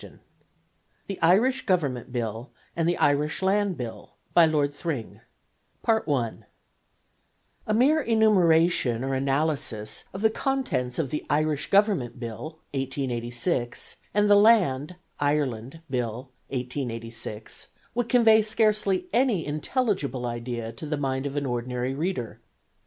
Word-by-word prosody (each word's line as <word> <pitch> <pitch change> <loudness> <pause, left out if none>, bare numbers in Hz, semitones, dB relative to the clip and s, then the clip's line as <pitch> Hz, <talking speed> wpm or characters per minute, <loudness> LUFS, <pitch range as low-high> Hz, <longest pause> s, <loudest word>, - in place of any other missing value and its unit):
] - - -42
THE 195 - -6
IRISH 215 +12 +3
GOVERNMENT 140 - 0
BILL 115 0 -3 0.3
AND 165 0 +1
THE 175 - 0
IRISH 150 +5 +1
LAND 195 -1 +1
BILL 120 -3 -7 0.2
BY 170 - +7
LORD 145 -2 +1
THRING 145 -6 -5 2.5
A 215 - +1
mere 290 +7 +4
enumeration 175 - +3
or 135 0 -1
analysis 135 -5 -1
of 190 +3 -6
the 220 - +5
contents 185 - -1
of 145 -6 -1
the 150 - -2
Irish 150 -1 0
Government 195 - +2
Bill, 120 +7 -6 0.2
1886, 125 -1 -2
and 210 0 +2
the 205 - +6
Land 185 - +4 0.2
(Ireland) 145 -1 -1
Bill, 125 -1 -3 0.2
1886, 115 -4 -5 0.3
would 240 0 -1
convey 225 -3 +6
scarcely 215 - +1
any 240 -9 +2
intelligible 150 - -1
idea 120 -1 -4
to 155 - -8
the 150 0 -1
mind 135 -1 -1
of 140 - -6
an 145 -1 -1
ordinary 125 +1 -2
reader. 145 - -3
145 Hz, 120 wpm, -26 LUFS, 125-195 Hz, 2.5 s, BY